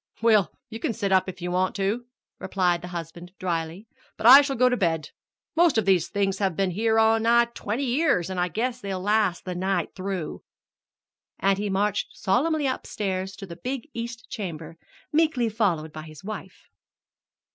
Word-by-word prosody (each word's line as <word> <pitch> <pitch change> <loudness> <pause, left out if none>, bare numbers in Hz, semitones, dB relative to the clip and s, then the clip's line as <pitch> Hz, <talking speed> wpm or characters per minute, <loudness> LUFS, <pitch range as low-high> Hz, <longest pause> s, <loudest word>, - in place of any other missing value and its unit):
"Well, 215 -5 +4 0.2
you 225 0 -8
can 230 - -1
sit 200 -3 -2
up 190 0 +3
if 180 -1 -9
you 175 - -2
want 185 +1 0
to," 205 +5 -1 0.3
replied 180 -3 0
her 180 - -7
husband 175 0 -7
dryly, 170 +2 -3 0.3
"but - - -5
I 265 +4 +11
shall 275 -1 -2
go 250 +2 +4
to 250 - +2
bed. 165 -7 -1 0.4
Most 335 -5 +4
of 220 - +2
these 185 -4 +3
things 195 -1 -1
have 190 -4 0
been 195 0 0
here 220 +4 +1
nigh 225 +1 +4
on - - +2
to 235 - -21
twenty 225 +7 -3
years, 255 - +2
an' 185 - -3
I 180 - +2
guess 240 +8 -2
they'll 195 -2 -3
last 205 -2 +1
the 180 - -3
night 190 +2 -1
through." 185 -4 -4 1.0
And 195 0 +2
he 205 0 -2
marched 205 +1 -1
solemnly 290 +9 +1
upstairs 190 -7 -3
to 195 - -8
the 170 -3 -10
big 270 +3 -4
east 230 -1 -6
chamber, 165 -8 -6 0.4
meekly 300 -7 +2
followed 175 -8 0
by 155 - -6
his 155 -1 -12
wife. 195 -2 -8
195 Hz, 185 wpm, -25 LUFS, 180-230 Hz, 1.0 s, I